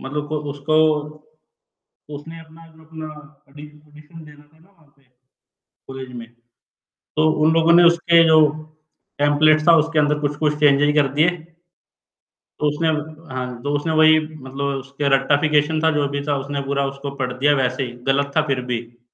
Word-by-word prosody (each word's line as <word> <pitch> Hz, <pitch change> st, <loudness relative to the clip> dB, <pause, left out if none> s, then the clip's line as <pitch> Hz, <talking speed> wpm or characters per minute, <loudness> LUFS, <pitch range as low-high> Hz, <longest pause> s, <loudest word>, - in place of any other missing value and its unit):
मतलब 145 Hz, +2 st, -5 dB
को 155 Hz, -, -3 dB
उसको 145 Hz, +2 st, -3 dB, 1.4 s
उसने 165 Hz, +3 st, -11 dB
अपना 160 Hz, +1 st, -17 dB
जो 160 Hz, -, -19 dB
अपना 160 Hz, 0 st, -9 dB, 0.4 s
ऑडिशन 150 Hz, +2 st, -15 dB
देना 150 Hz, -1 st, -16 dB
था 150 Hz, +2 st, -28 dB
ना 165 Hz, +4 st, -25 dB
वहाँ 165 Hz, -6 st, -29 dB
पे 140 Hz, -, -32 dB, 0.9 s
कॉलेज 130 Hz, -1 st, -9 dB
में 115 Hz, -1 st, -9 dB, 0.9 s
तो 155 Hz, +1 st, +3 dB
उन 160 Hz, +1 st, +4 dB
लोगों 165 Hz, 0 st, +3 dB
ने 175 Hz, -, +6 dB
उसके 170 Hz, 0 st, +4 dB
जो 160 Hz, 0 st, +5 dB, 0.8 s
टेम्पलेट्स 155 Hz, +2 st, +3 dB
था 170 Hz, -, +7 dB
उसके 160 Hz, 0 st, +1 dB
अंदर 150 Hz, 0 st, +1 dB
कुछ-कुछ 150 Hz, +1 st, -1 dB
चेंज़ेस 145 Hz, 0 st, +3 dB
कर 145 Hz, -2 st, +3 dB
दिए। 155 Hz, +4 st, +3 dB
तो 170 Hz, 0 st, -13 dB, 1.0 s
उसने 150 Hz, +3 st, -1 dB
हाँ, 150 Hz, -6 st, -5 dB
तो 145 Hz, -, -3 dB
उसने 160 Hz, +2 st, -3 dB
वही 155 Hz, 0 st, +5 dB
मतलब 140 Hz, -3 st, -8 dB, 0.2 s
उसके 140 Hz, +2 st, -4 dB
रट्टाफिकेशन 150 Hz, +3 st, +1 dB
था, 160 Hz, -, +3 dB
जो 145 Hz, -2 st, 0 dB
भी 140 Hz, 0 st, -4 dB
था 145 Hz, -, 0 dB
उसने 140 Hz, +1 st, -5 dB
पूरा 140 Hz, 0 st, -2 dB
उसको 140 Hz, +1 st, -6 dB
पढ़ 125 Hz, -1 st, -2 dB
दिया 140 Hz, +4 st, +1 dB
वैसे 130 Hz, 0 st, -1 dB
ही 125 Hz, -2 st, -5 dB
गलत 140 Hz, +1 st, 0 dB
था 155 Hz, -, +4 dB
फिर 135 Hz, -2 st, -1 dB
भी। 120 Hz, 0 st, -7 dB
150 Hz, 165 wpm, -20 LUFS, 140-160 Hz, 1.4 s, था